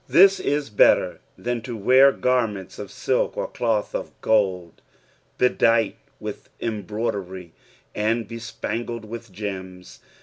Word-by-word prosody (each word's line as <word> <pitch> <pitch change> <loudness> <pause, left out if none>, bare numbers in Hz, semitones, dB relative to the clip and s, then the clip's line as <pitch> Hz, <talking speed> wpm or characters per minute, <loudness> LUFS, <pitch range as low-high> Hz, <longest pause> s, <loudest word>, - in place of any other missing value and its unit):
This 195 +1 +7
is 145 -7 -1
better 105 - +4 0.2
than 120 -1 -2
to 120 -1 -6
wear 130 +6 +6
gannents 115 -8 -1
of - - -5
utk - - -1
or - - -1
cloth 110 -3 -1
of - - -5
gold, 95 -6 +1 0.6
bedight 115 -3 +3 0.2
with - - -7
embroidery 100 -5 -4 0.4
and 110 +1 0
bespangled 115 0 -5
with 115 0 -8
gems. 95 -2 -7
110 Hz, 115 wpm, -23 LUFS, 100-120 Hz, 0.6 s, This